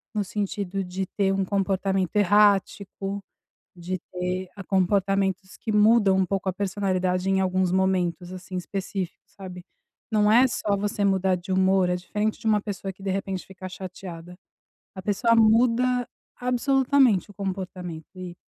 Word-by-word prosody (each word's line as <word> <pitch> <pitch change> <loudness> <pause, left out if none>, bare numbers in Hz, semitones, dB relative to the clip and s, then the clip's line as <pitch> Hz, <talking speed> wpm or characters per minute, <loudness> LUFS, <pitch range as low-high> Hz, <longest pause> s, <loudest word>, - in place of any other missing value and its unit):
no 210 - +1
sentido 195 -1 -3
de 185 +1 -4
ter 195 -1 +2
um 195 -1 0
comportamento 195 -1 0
errático, 200 -1 +2 0.5
de 180 +1 -4
ter 180 +1 -2
a 195 - -8
comportamentos 195 0 0
que 220 - -4
mudam 210 -2 +5
um 190 - +3
pouco 195 +1 -3
a - - -2
personalidade 185 -2 -1
em 190 0 +2
alguns 185 0 +1
momentos, 185 -2 0
assim, 185 0 -8
específicos, 185 0 -5
sabe? 180 -3 -10 0.5
Não 210 -1 +3
é 250 +4 +6
só 210 -4 -1
você 205 0 -2
mudar 190 -1 +2
de 180 +2 -7
humor, 190 -1 +3
é 180 - +1
diferente 210 +4 -2
de - - -4
uma 210 -1 +3
pessoa 195 -2 -5
que, 195 - -16
de 195 - -1
repente, 195 -1 -3
fica 190 -1 -9
chateada. 180 -2 -9 0.6
A 190 - -6
pessoa 215 +4 +2
muda 240 +2 +3 0.3
absolutamente 250 - +2
o - - -17
comportamento. 185 -4 -5
E 180 -1 -8
195 Hz, 155 wpm, -25 LUFS, 185-205 Hz, 0.6 s, é